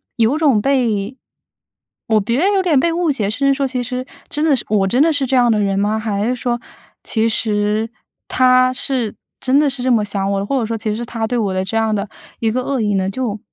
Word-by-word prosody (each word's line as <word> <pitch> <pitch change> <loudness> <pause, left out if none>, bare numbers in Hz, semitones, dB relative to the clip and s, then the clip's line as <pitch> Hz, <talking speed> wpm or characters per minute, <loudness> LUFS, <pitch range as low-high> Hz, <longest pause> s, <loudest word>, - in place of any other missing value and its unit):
有 235 +6 +2
种 280 -9 +3
被 240 -3 0 0.9
我 220 -1 +3
觉得 240 - 0
有 385 - +3
点 335 -7 +3
被 330 +4 +1
误 345 -2 0
解， 220 -8 -1
甚 275 +6 0
至 275 - +4
说 275 0 0
其 255 -1 -3
实， 250 +1 -4 0.2
真 300 +2 0
的 300 -3 +4
是 245 - -3
我 200 -2 +2
真 245 +7 +2
的 325 +2 +4
是 285 -3 0
这 265 +1 0
样 245 -2 +4
的 215 - +2
人 195 -1 0
吗？ 210 +2 +1
还 210 -2 -2
是 250 +2 0
说， 240 -1 -2 0.4
其 225 0 0
实 215 0 0 0.4
他 255 0 +4
是 255 -3 -3 0.2
真 265 +2 +2
的 300 - +3
是 260 -2 -5
这 255 - +1
么 220 -3 +3
想 200 -1 -2
我 195 - 0
的， 195 - -2
或 270 +5 0
者 225 - -2
说 225 0 -2
其 215 -1 -2
实 235 - -4
他 230 -1 -3
对 245 +3 -2
我 205 -4 0
的 185 0 -1
这 190 - -4
样 220 -1 +1
的 200 0 -2 0.3
一 225 -1 +1
个 255 +3 -1
恶 275 0 -1
意 210 -2 0
呢， 190 0 0
就 220 -1 -3
235 Hz, 270 characters per minute, -18 LUFS, 210-260 Hz, 0.9 s, 至